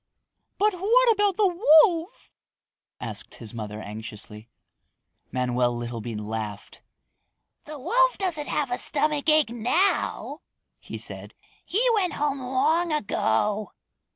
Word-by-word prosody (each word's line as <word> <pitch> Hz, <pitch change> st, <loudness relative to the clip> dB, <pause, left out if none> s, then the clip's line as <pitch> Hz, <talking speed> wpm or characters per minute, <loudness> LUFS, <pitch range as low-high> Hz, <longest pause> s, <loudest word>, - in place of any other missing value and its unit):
"What 420 Hz, +1 st, +2 dB, 0.4 s
about 410 Hz, -3 st, +1 dB
the 425 Hz, -, +3 dB, 0.4 s
wolf?" 345 Hz, +4 st, -5 dB, 0.7 s
asked -, -, -6 dB
his 115 Hz, -2 st, -10 dB
mother 105 Hz, -2 st, -6 dB
anxiously. 105 Hz, +1 st, -9 dB, 0.8 s
Manoel 125 Hz, -1 st, 0 dB
Littlebean 115 Hz, -2 st, -5 dB
laughed. 105 Hz, -2 st, -6 dB, 0.8 s
"The 305 Hz, 0 st, -8 dB
wolf -, -, +2 dB
doesn't 345 Hz, -7 st, -2 dB
have 280 Hz, -4 st, -1 dB
any 245 Hz, -, -1 dB
stomachache 305 Hz, -2 st, +1 dB
now," 245 Hz, -, 0 dB, 0.4 s
he -, -, -8 dB
said. -, -, -5 dB, 0.3 s
"He 460 Hz, +7 st, +1 dB
went 390 Hz, -5 st, +1 dB
home 285 Hz, -2 st, -1 dB
long 290 Hz, +7 st, +1 dB
ago." 210 Hz, -, 0 dB
260 Hz, 105 wpm, -25 LUFS, -, 0.8 s, the